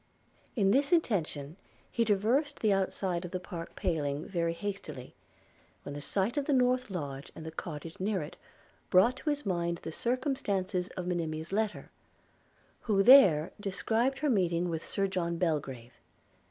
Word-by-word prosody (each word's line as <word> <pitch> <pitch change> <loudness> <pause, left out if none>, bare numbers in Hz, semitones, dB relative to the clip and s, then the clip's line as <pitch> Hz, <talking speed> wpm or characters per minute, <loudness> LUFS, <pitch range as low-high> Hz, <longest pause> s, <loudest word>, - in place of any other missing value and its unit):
In 200 -5 +3
this 280 - +2
intention 170 - 0 0.3
he 235 - +2
traversed 230 +8 +1
the 215 -3 +3
outside 190 -2 -1
of 180 - -5
the 185 - -3
park 170 -2 -8
paling 150 -6 -1
very 170 -3 -1
hastily, 170 -8 -6 0.7
when 140 - -6
the 145 - -6
sight 200 - 0
of 285 - +1
the 290 - +1
north 250 -1 +2
lodge 140 -7 -5
and 160 - -9
the 160 - -5
cottage 160 0 -7
near 190 -3 0
it, 150 - -9 0.5
brought 230 +8 +5
to 300 - -3
his 290 0 -1
mind 170 -2 -1
the 160 - -5
circumstances 205 - -1
of 180 - -3
Monimia's 165 -2 -3
letter; 210 +1 -2 0.9
who 200 -3 +2
there 195 - +7
described 225 +6 0
her 300 +1 0
meeting 175 -4 +1
with 165 -1 -3
Sir 195 - 0
John 175 -3 -1
Belgrave. 140 -8 -2
185 Hz, 155 wpm, -30 LUFS, 165-225 Hz, 0.9 s, there